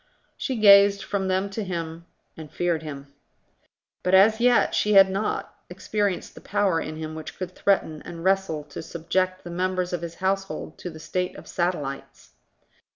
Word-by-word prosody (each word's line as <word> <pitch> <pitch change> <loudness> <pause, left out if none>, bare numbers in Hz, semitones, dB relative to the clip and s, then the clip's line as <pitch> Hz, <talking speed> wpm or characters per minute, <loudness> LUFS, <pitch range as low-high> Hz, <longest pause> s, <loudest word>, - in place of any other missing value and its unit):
She 265 - -3
gazed 200 -2 +6
from 195 -2 -2
them 190 +1 0
to 215 +2 -3
him, 170 -2 -5 0.3
and 155 -2 -10
feared 175 -2 0
him. 140 -2 -9 0.9
But 180 +1 +3
as 215 +4 +6
yet 245 0 +4
she 210 - +2
had 195 -1 +7
not 195 +3 -2 0.2
experienced 205 -3 -2
the - - -13
power 200 -5 +1
in 155 - -5
him 155 0 -6
which 155 0 -8
could 185 -1 -5
threaten 160 -6 +1
and 165 -1 -9
wrestle 190 -5 +1
to - - -6
subject 185 +3 -2
the 175 - -8
members 180 0 -1
of 175 - -2
his 170 0 -6
household 190 -4 -3
to 180 - -5
the 160 -2 -10
state 180 +3 -3
of - - -12
satellites. 170 -6 -4
185 Hz, 170 wpm, -25 LUFS, 165-195 Hz, 0.9 s, had